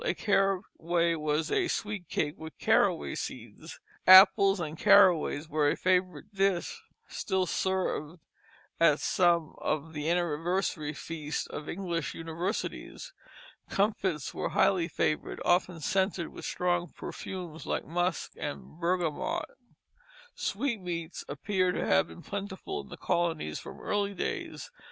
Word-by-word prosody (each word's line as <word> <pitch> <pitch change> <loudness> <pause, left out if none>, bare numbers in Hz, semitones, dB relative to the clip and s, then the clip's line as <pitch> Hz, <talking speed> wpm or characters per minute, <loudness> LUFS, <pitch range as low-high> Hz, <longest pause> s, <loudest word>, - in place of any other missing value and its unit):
A 480 - 0
caraway 185 -4 +1
was 155 0 -1
a 370 - +2
sweet 205 - -3
cake 150 -1 0
with 160 -3 -10
caraway 70 -2 +2
seeds. - - -7 0.3
Apples 195 +1 +8
and 155 -2 -4
caraways 180 -6 +5
were 150 -1 +2
a - - 0
favorite 180 -2 0
dish, 195 - 0 0.3
still 190 -1 -1
served 180 -3 -1 0.6
at 155 -3 +5
some 170 -3 +2
of 155 +2 -2
the 150 +1 -2
anniversary 170 -1 0
feasts 155 +1 -4
of 150 - -7
English 170 -5 -3
universities. 175 - -4 0.6
Comfits 195 -7 0
were - - -2
highly 180 -4 +3
flavored, 155 -2 -1
often 175 -1 +2
scented 190 +1 0
with - - -9
strong 175 -1 0
perfumes 170 0 -7
like - - -1
musk 175 +3 -1
and 150 +2 -6
bergamot. 170 -3 -1 0.9
Sweetmeats 180 - -3
appear 185 +5 0
to - - -2
have 80 0 +3
been 80 - -12
plentiful 200 - -5
in - - -15
the - - -9
colonies 170 - -1
from - - -10
early 200 -1 -1
days. - - -4
175 Hz, 125 wpm, -29 LUFS, 160-190 Hz, 0.9 s, Apples